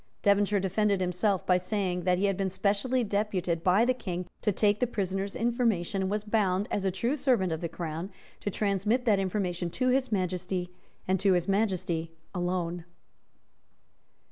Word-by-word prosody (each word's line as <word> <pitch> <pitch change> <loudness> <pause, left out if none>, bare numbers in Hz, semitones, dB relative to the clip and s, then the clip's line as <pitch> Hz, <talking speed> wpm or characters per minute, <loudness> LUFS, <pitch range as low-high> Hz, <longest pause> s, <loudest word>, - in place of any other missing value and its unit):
Devonshire 200 0 +3
defended 200 +1 +1
himself 185 +2 0
by 180 - +4
saying 180 -1 -2
that 180 -1 +3
he 195 - +1
had 195 -1 +1
been 195 0 -1
specially 210 +7 +1
deputed 195 -5 -1
by 190 +6 +4
the 255 - +3
King 180 -7 -4 0.2
to 210 - +2
take 205 +1 +2
the 250 - +2
prisoner's 195 -2 -2
information, 225 -6 0
and 190 - 0
was 210 +1 -1
bound, 205 -3 +1
as 200 - -1
a 195 - +2
true 235 +9 -1
servant 245 - +2
of 160 - -3
the 170 - -2
Crown, 165 +2 -5 0.3
to - - -3
transmit 210 +5 0
that 210 -4 +4
information 185 -3 -1
to 255 +8 0
His 260 0 +1
Majesty 180 -1 -2 0.4
and 190 0 +2
to 195 0 +4
His 175 0 +1
Majesty 185 -5 0 0.2
alone. 175 -2 -2
195 Hz, 170 wpm, -29 LUFS, 180-210 Hz, 0.4 s, by